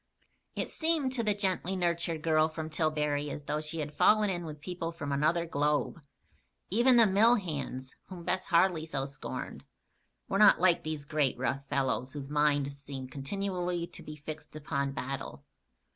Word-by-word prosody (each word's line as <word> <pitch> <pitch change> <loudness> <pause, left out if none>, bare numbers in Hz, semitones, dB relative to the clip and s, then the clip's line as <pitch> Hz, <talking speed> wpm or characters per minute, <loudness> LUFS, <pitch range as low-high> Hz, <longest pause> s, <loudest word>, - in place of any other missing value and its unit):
It - - -2
seemed 315 -5 +1
to 250 -3 -1
the 210 -2 +1
gently 190 -2 -1
nurtured 170 -3 -1
girl 155 -1 +3
from 160 0 -6
Tillbury 150 -2 0
as 145 - -6
though 150 +1 -2
she 155 +1 -4
had 150 0 -5
fallen 210 +2 +4
in 175 -2 -3
with 150 -1 -7
people 170 +1 -4
from 145 -4 -5
another 155 +5 +2
globe. 150 +1 0 0.7
Even 240 +5 +5
the 230 -1 +7
mill 215 +4 +5
hands, 140 - -4
whom 180 -2 -9
Bess 185 +2 -1
Harley 170 -2 +3
so 135 -4 -2
scorned, 140 +1 -7 0.6
were 195 - 0
not 210 -1 +7
like 175 -1 +4
these 155 -3 -4
great, 145 -3 +1
rough 135 +2 -2
fellows 130 -1 0
whose 140 -1 -7
minds 145 -2 +1
seemed 135 -2 -7
continually 180 +4 -2
to - - -11
be 155 - -8
fixed 155 +1 -9
upon 140 -2 -2
battle. 135 0 -5
155 Hz, 170 wpm, -30 LUFS, 145-180 Hz, 0.7 s, the